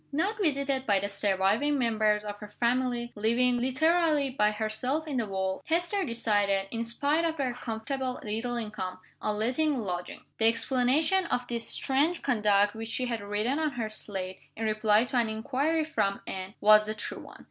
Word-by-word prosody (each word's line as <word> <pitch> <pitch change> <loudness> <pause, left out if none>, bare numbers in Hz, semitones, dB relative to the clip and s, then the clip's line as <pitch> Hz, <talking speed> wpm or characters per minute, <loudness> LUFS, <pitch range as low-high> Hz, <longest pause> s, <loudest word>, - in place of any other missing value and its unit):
Not 385 +10 0
visited 275 -5 0
by 200 -2 +4
the 200 +1 -3
surviving 205 +8 +1
members 215 -4 +2
of 205 -1 -6
her 210 - -9
family, 240 +1 0
living, 240 +3 +2
literally, 300 +2 +2
by 210 -5 +2
herself 220 +8 -2
in 280 -4 -2
the 230 -3 0
world, 190 -1 -2
Hester 350 +5 +1
decided, 205 - +1
in 230 0 -2
spite 285 +7 0
of 325 -1 0
her 260 -4 -1
comfortable 250 +2 -4
little 225 +3 -3
income, 210 -5 -4 0.2
on 210 -1 -1
letting 260 +7 +1
lodgings. 180 -6 -4 0.2
The 225 - +4
explanation 265 +10 +2
of 245 -5 -1
this 235 -1 0
strange 295 +6 +1
conduct 210 -4 +3
which 225 0 -6
she 250 +2 0
had 235 -3 -3
written 210 +8 -1
on 310 -3 0
her 230 -3 -3
slate, 190 -3 -6 0.2
in 225 - -2
reply 215 0 +3
to 250 +1 -2
an 235 -2 +2
inquiry 275 +9 0
from 200 -11 -1
Anne, 190 +2 -6
was 215 0 +6
the 215 - -2
true 210 - -4
one. - - -13
235 Hz, 180 wpm, -28 LUFS, 210-275 Hz, 0.2 s, was